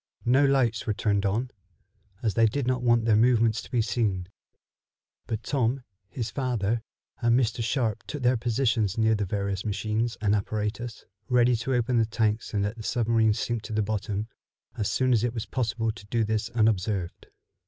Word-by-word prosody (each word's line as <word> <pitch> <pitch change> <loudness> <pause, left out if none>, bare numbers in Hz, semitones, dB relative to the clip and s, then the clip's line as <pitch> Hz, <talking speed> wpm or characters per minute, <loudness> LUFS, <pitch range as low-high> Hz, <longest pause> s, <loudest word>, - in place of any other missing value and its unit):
No 130 +4 +4
lights 130 -6 +2
were 105 - 0
turned 100 -1 +1
on, 115 +6 -1 0.7
as 110 -3 +1
they 115 -1 +4
did 135 +4 -2
not 130 0 0
want 120 -2 +3
their 110 -2 +4
movements 115 -1 +3
to - - -13
be 120 -3 +1
seen, 100 -6 -1 1.0
but 110 -1 -3
Tom, 130 -1 0 0.3
his 115 -3 -4
father 120 -4 -1 0.4
and 120 +1 +4
Mr. 115 -2 0
Sharp 115 -3 0
took 145 -3 -5
their 125 +1 +4
positions 115 -3 0
near 110 0 +3
the 105 -2 0
various 100 0 -2
machines 110 +2 -1
and 105 -2 +2
apparatus, 105 +3 -3 0.2
ready 125 0 +4
to 125 +3 -1
open 120 0 +1
the 115 - +3
tanks 110 -1 0
and 100 -2 0
let 105 +3 -3
the - - -7
submarine 115 -1 +2
sink 120 0 -2
to 110 - -7
the 110 0 +1
bottom, 105 0 -2 0.5
as 105 - -1
soon 130 -1 +2
as 115 -2 +2
it 120 0 -1
was 115 -1 -3
possible 115 0 -1
to 100 -1 -13
do 115 +1 +1
this 110 0 -1
unobserved. 105 -5 0
115 Hz, 185 wpm, -27 LUFS, 105-120 Hz, 1.0 s, No